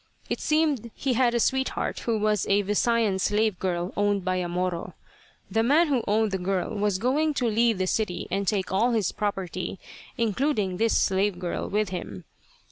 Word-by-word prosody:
It - - -1
seemed 305 -7 +1
he 270 -2 -1
had 240 0 +2
a - - +2
sweetheart 265 +3 0
who 230 -2 -1
was 210 -1 +1
a 200 +1 +3
Visayan 210 0 +1
slave 210 0 +1
girl 175 -1 -2
owned 205 -2 +1
by 185 0 0
a 180 -1 -2
Moro. 180 0 -3 0.6
The 225 +3 +2
man 300 +8 +4
who 255 -5 +1
owned 215 0 +2
the 190 - -1
girl 185 +2 -1
was 205 -2 0
going 290 +8 +1
to 250 - 0
leave 230 0 +2
the 185 - 0
city 185 -2 -1
and 195 +1 -1
take 190 -2 0
all 230 +6 +2
his 215 -5 +1
property, 190 -3 -3 0.4
including 225 -4 0
this 225 +2 +2
slave 195 -1 +1
girl, 175 -1 -3
with 210 0 0
him. 105 - -6
205 Hz, 185 wpm, -26 LUFS, 185-235 Hz, 0.6 s, man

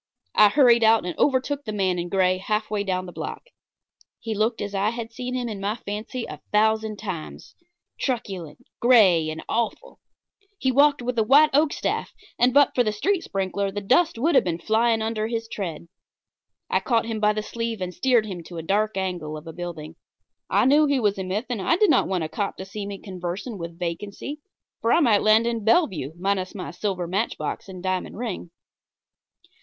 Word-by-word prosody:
I 210 - +7
hurried 235 -2 +5
out 220 -3 +5
and 180 - -4
overtook 285 +1 +1
the 215 - -5
man 190 -4 0
in 175 0 -4
gray 185 -1 +2
half 210 +2 -2
way 205 -1 0
down 185 -2 -2
the 180 - -8
block. - - -6 0.8
He 225 -1 -4
looked 220 +3 0
as 205 0 -4
I 200 +2 +1
had 230 0 -6
seen 250 +2 -4
him 250 -1 -2
in 210 -4 -5
my 205 +2 -1
fancy 225 +3 -5
a - - -9
thousand 220 0 +2
times 185 -7 -7 0.5
truculent, 190 - -4
gray 195 -10 +5
and 155 +1 -6
awful. 235 - -3 0.6
He 265 - +1
walked 285 0 +4
with 250 0 -2
the 220 - +4
white 290 +7 +6
oak 295 +1 +4
staff, - - -2 0.3
and 245 +2 +4
but 285 +2 +5
for 245 - +3
the 215 - 0
street 350 - 0
sprinkler 195 +1 -2
the 200 +1 -4
dust 305 - +2
would 315 +9 +1
have - - +5
been 170 -2 -2
flying 220 +4 +1
under 220 -1 -1
his 230 0 -3
tread. 175 -7 -5 0.8
I - - +1
caught 230 -3 +1
him 225 -1 -3
by 210 0 +3
the 215 0 -3
sleeve 230 0 -4
and 180 -1 -4
steered 245 -2 +2
him 185 -5 -6
to 175 - -9
a 165 - -5
dark 205 +4 0
angle 175 -5 -3
of 155 - -11
a 165 - -8
building. 165 -2 -7 0.5
I - - +3
knew 295 +3 +5
he 280 -2 +2
was 205 -4 +1
a - - -2
myth, 195 +6 -2
and 240 -5 -3
I 330 - +2
did 420 +1 +4
not - - +3
want 185 -3 -1
a - - -2
cop 200 +5 -3
to 190 - -6
see 200 +1 -6
me 200 -1 -5
conversing 190 +3 -6
with 170 0 -7
vacancy, 200 - -5 0.4
for 230 - +1
I - - +5
might 230 -10 +4
land 215 +2 +5
in 230 -2 -1
Bellevue 195 - +2
minus 190 +1 -1
my 185 - -5
silver 190 -4 -3
matchbox 195 +2 -3
and 185 -1 -9
diamond 185 0 -2
ring. 220 -7 -5
210 Hz, 205 wpm, -24 LUFS, 185-235 Hz, 0.8 s, I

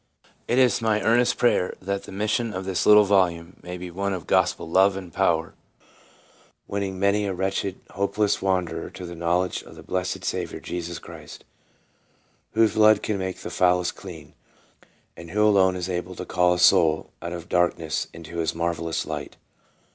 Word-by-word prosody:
It 120 - +1
is 125 -5 +4
my 110 -2 +2
earnest 120 +2 +3
prayer 120 -6 +2
that 100 +1 -3
the - - -10
mission 110 +2 -1
of 95 +1 -4
this 95 -2 -1
little 105 0 +8
volume 90 -3 +1
may 90 0 -7
be 90 0 -7
one 100 +2 -2
of 90 -4 -5
gospel - - +1
love 95 +3 +3
and 90 -4 -9
power, 85 -4 +1 1.1
Winning 100 -2 -3
many 100 +2 +1
a 95 - -2
wretched, 95 +1 -2
hopeless 100 +2 0
wanderer 95 -3 -1
to 90 - -9
the 85 - -7
knowledge 85 +2 0
of - - -14
the - - -12
blessed 90 0 -3
Saviour - - -3
Jesus 85 -1 -5
Christ, - - -12 1.1
"whose 110 -1 +3
blood 110 0 +5
can 105 -2 -1
make 95 -1 -4
the - - -6
foulest 90 -1 +2
clean," - - -11 0.8
and 85 0 -11
who 105 +4 +2
alone 95 -3 +4
is 90 -1 -3
able 90 0 -4
to - - -6
call 90 -1 +2
a - - -4
soul 80 -2 +4
"out 85 - -5
of 85 -1 -7
darkness 85 -3 0
into 85 0 -10
his 80 -1 -1
marvellous 85 -1 -2
light." - - -6
95 Hz, 175 wpm, -24 LUFS, 85-100 Hz, 1.1 s, little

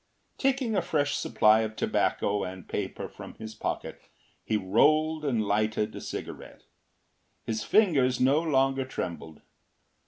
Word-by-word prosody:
Taking 265 -4 +1
a - - +2
fresh 145 -2 0
supply 110 -1 +4
of 110 -1 -2
tobacco 100 -2 0
and 95 -1 -7
paper - - -4
from - - -11
his 110 0 -8
pocket, 110 - -4 0.4
he 110 - 0
rolled 155 +10 +2
and 120 -7 0
lighted 105 +1 0
a - - -7
cigarette. - - -8 0.8
His 110 -1 -3
fingers 140 - +3
no 135 +5 +4
longer 135 -4 +1
trembled. 85 - -6
125 Hz, 130 wpm, -28 LUFS, 110-150 Hz, 0.8 s, supply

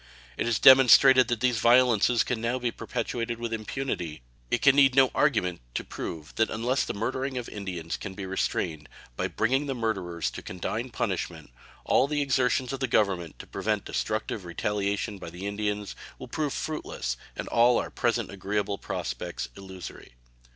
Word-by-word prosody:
It - - -2
is 120 - +2
demonstrated 130 0 +8
that 120 -3 -1
these 125 -3 +2
violences 120 0 +4
can 120 -3 -2
now 120 +2 0
be 120 -2 -1
perpetrated 115 0 -3
with 115 -1 -4
impunity, 110 - -3 0.3
and - - +3
it - - -5
can 140 -1 +6
need 135 -2 +5
no 135 -1 +5
argument 90 - +1
to - - -1
prove 80 -3 -7
that 110 - +3
unless 120 +4 0
the - - -4
murdering 130 +5 -2
of 125 - -4
Indians 90 -5 -5
can 95 - -7
be 100 -1 -5
restrained 85 -5 -2 0.3
by - - -1
bringing 135 +6 0
the 135 - -2
murderers 95 -8 -2
to - - -7
condign 110 +7 -4
punishment, 120 - -3 0.3
all 135 - +3
the 145 0 0
exertions 130 -1 +1
of 135 - -4
the 130 - 0
Government 95 - 0
to - - -9
prevent - - -2
destructive 110 -1 -2
retaliations 100 +3 -2
by - - -7
the 90 +3 -8
Indians 105 0 -3 0.2
will 130 - -9
prove 150 +3 -2
fruitless 140 - -3 0.2
and - - -5
all 120 +1 +4
our - - -2
present 115 -3 0
agreeable 100 +1 -2
prospects - - -4
illusory. 95 -8 -10
115 Hz, 170 wpm, -27 LUFS, 95-130 Hz, 0.3 s, demonstrated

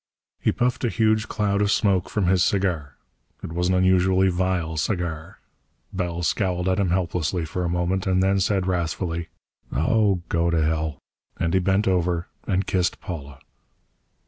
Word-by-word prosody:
He - - +2
puffed 125 +2 -1
a 120 - +2
huge 110 -1 +1
cloud 100 -2 0
of 100 - +2
smoke 95 -4 +2
from 105 -3 0
his 90 0 +3
cigar. 90 -10 0 0.5
It 80 - -6
was 90 +1 0
an 95 - +2
unusually 95 +1 +3
vile 90 -3 -1
cigar. 80 -2 -3 0.6
Bell 85 -2 -2
scowled 90 0 0
at 95 +1 +1
him 95 -3 +1
helplessly 90 -1 -1
for 90 +3 -3
a 85 - -1
moment 90 +2 -1
and 95 0 +2
then 95 +1 +2
said 95 -1 +1
wrathfully: 85 -2 -2 0.4
"Oh, 95 - +2
go 85 0 +1
to 85 -1 +1
hell!" 80 -1 -1 0.4
And 85 0 -1
he 95 - +4
bent 95 +3 +1
over 90 -2 +1 0.2
and 95 0 +1
kissed 90 -2 0
Paula. 70 -7 -8
90 Hz, 165 wpm, -24 LUFS, 85-95 Hz, 0.6 s, he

